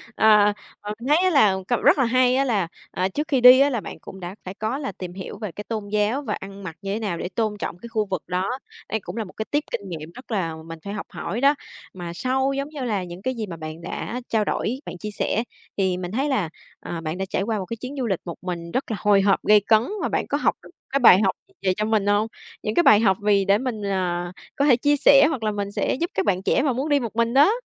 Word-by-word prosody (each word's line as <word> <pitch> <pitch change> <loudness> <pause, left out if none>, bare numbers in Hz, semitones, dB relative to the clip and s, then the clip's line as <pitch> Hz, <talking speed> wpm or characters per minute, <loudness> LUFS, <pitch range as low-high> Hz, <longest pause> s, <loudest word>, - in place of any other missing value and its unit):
Ờ, 210 -1 +5 0.3
ờ, 210 0 -4
mình 245 - -6
thấy 355 +5 +4
là 210 -10 +5
cậu 240 - +1
rất - - +5
là 265 - +3
hay 255 +1 +3
á 270 - +3
là, 205 -9 +1 0.2
à, 185 +1 0
trước 295 +10 -3
khi 275 -6 +1
đi, 250 +1 +10
á, 280 - +5
là 240 -6 -2
bạn - - -8
cũng 190 - -11
đã 180 +2 -7
phải 185 - -6
có 220 +6 -2
là 275 -5 -4
tìm 180 -1 -8
hiểu 190 +1 -7
về 210 -4 -5
cái 210 +6 -7
tôn 215 -3 -4
giáo 210 +6 +1
và 220 -7 -3
ăn 195 0 -9
mặc 165 -4 -6
như 195 0 -3
thế 220 - -2
nào 195 -6 -2
để 180 - -4
tôn 210 +1 -1
trọng 170 - -4
cái 235 +6 -10
khu 215 -2 0
vực 190 -5 -3
đó. 185 +3 -1 0.4
Đây 220 - -1
cũng 215 - -8
là 225 - -1
một 185 - -12
cái 220 - -2
tip 295 +1 +1
kinh 200 - -4
nghiệm 160 -1 -7
rất 255 -1 -12
là 170 -6 -1
mình 165 -1 -8
phải 200 - -4
học 210 - -5
hỏi 230 - -4
đó. 280 +2 +5 0.4
Mà 175 -2 -6
sau 265 +6 0
giống 275 +2 -3
như 295 -3 -7
là 210 -6 -1
những 175 +1 -9
cái 260 +4 -2
gì 220 -2 -3
mà 170 -2 -7
bạn 155 +1 -7
đã 240 +7 -5
trao 215 -2 +1
đổi, 255 +5 -1
bạn 180 - -7
chia 210 +3 -6
sẻ, 215 +2 -1 0.3
thì 190 -2 +1
mình 180 -1 -5
thấy 270 +7 0
là, 205 -12 0 0.3
ờ, 170 -1 -6
bạn 160 +2 -4
đã 190 - -2
trải - - -1
qua 220 +1 -1
một 190 - -4
cái 230 +4 -5
chuyến 255 +5 -7
du 255 - -1
lịch 190 -4 0
một 170 - -6
mình 170 -2 -5
rất 255 +1 -2
là 210 - -2
hồi 205 0 +4
hộp, 195 0 +2
gay 210 0 +6
cấn 220 -1 +6 0.2
và - - 0
bạn - - -1
có - - 0
học - - +1
được - - -13 0.2
cái 275 - +2
bài 210 -6 +8
học 190 - +2
gì 385 - -28
về 185 -1 +2
cho 215 - 0
mình 220 -2 +1
hông? 205 +2 +3 0.4
Những 215 - -1
cái 345 - +4
bài 210 - +7
học 195 -4 +3
vì 205 -2 +3
để 200 +1 +4
mình, 225 -4 -3
à, 175 -2 -1 0.2
có 280 - +2
thể 270 -5 +6
chia 290 +3 +3
sẻ 275 +1 +7
hoặc 265 -8 -3
là 215 - +1
mình 200 -1 -3
sẽ - - 0
giúp 340 +6 -2
các 190 - 0
bạn 190 -2 +1
trẻ 265 - +2
mà 270 -4 +2
muốn 270 +5 -2
đi 290 -1 +4
một 230 -4 -5
mình 230 0 +1
đó? 390 - +5
210 Hz, 290 wpm, -23 LUFS, 190-255 Hz, 0.4 s, đi